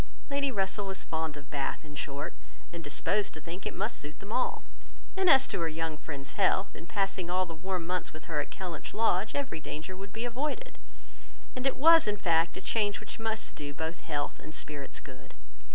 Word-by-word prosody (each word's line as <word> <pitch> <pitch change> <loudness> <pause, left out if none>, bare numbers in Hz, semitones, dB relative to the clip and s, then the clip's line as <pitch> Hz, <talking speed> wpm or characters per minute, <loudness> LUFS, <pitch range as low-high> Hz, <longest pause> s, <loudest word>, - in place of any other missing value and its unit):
Lady 280 -1 +2
Russell 200 -1 0
was 190 0 -1
fond 160 -2 -2
of 145 -2 -11
Bath, 140 +2 -1
in 150 - -9
short, 145 -1 -3 0.4
and 170 -1 -5
disposed 195 +8 +1
to - - -6
think 170 +5 -5
it - - -3
must - - 0
suit 150 +1 -5
them 200 - -8
all; 255 - +1 0.5
and 380 -2 +4
as 265 -3 +9
to 200 - -1
her 165 - +2
young 160 0 -2
friend's 140 -3 -6
health, 195 0 +3
by - - -9
passing 195 -3 0
all 185 +1 +3
the 170 - -6
warm 180 +1 -2
months 180 0 0
with 155 - -9
her 150 -3 0
at - - -6
Kellynch 180 -4 -5
Lodge, 215 -2 +3
every 275 - -1
danger 160 +4 -5
would 195 +1 -7
be 225 +3 -3
avoided; 300 - -2 0.8
and 255 +1 +1
it 270 - +1
was 330 +1 +8
in 210 0 +2
fact, 165 -3 +3
a - - -4
change 205 -3 +2
which 215 - -7
must 220 -1 -1
do 145 -1 -5
both 160 +2 -2
health 145 -1 -2
and 155 - -7
spirits 145 -2 -4
good. - - -12
185 Hz, 210 wpm, -31 LUFS, 155-215 Hz, 0.8 s, as